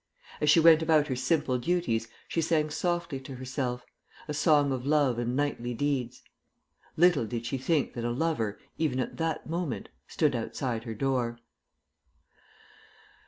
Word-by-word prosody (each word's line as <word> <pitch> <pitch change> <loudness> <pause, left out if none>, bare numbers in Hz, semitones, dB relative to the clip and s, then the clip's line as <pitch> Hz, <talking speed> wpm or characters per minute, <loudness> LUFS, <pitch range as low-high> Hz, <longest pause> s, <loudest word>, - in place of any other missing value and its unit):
As 150 - +3
she 165 - +7
went 165 -1 +7
about 155 -2 +3
her 130 - 0
simple 130 0 +1
duties 120 -8 0 0.2
she 165 - -1
sang 155 -1 +1
softly 170 -3 -1
to 135 0 -9
herself, 125 -1 -3 0.4
a 150 - -3
song 145 -2 +3
of 130 -2 -2
love 140 -4 +2
and 120 +1 -1
knightly 125 -4 -1
deeds. 130 -2 -2 0.7
Little 165 -8 +4
did 115 0 -4
she 130 +3 -2
think 145 +2 0
that 120 - -5
a 120 - 0
lover, 120 -5 -1 0.2
even 145 -5 0
at 125 - -3
that 165 -1 -2
moment, 155 - -3 0.2
stood - - +1
outside 120 -3 -3
her 115 -2 -5
door. 125 -1 -1
135 Hz, 155 wpm, -29 LUFS, 125-160 Hz, 0.7 s, she